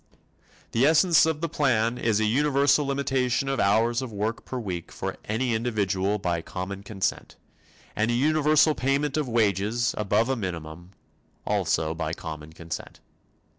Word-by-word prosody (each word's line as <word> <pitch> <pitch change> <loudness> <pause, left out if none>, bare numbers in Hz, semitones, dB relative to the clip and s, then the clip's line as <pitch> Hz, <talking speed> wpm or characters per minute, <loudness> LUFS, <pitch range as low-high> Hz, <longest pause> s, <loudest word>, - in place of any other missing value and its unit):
The 115 - +1
essence 160 0 +5
of 160 -1 -1
the 165 - 0
plan 125 -6 +1
is 110 -2 +1
a 110 - +2
universal 140 +4 +3
limitation 135 -2 0
of 135 0 -1
hours 115 +4 +2
of 130 -3 -6
work 110 +3 -3
per 130 - -5
week 95 -8 -5
for - - -5
any 115 +3 -1
individual 105 -3 0
by 85 -4 -1
common 95 +3 -6
consent, 100 -1 -3 0.6
and 110 +2 +1
a - - +1
universal 155 +3 +3
payment 140 +2 0
of 150 -4 -1
wages 110 +1 +1
above 105 +2 +2
a 135 - 0
minimum, 85 -3 -6 0.5
also 80 0 0
by 80 -1 -3
common 80 -2 -7
consent. 80 0 -8
115 Hz, 150 wpm, -26 LUFS, 95-135 Hz, 0.6 s, essence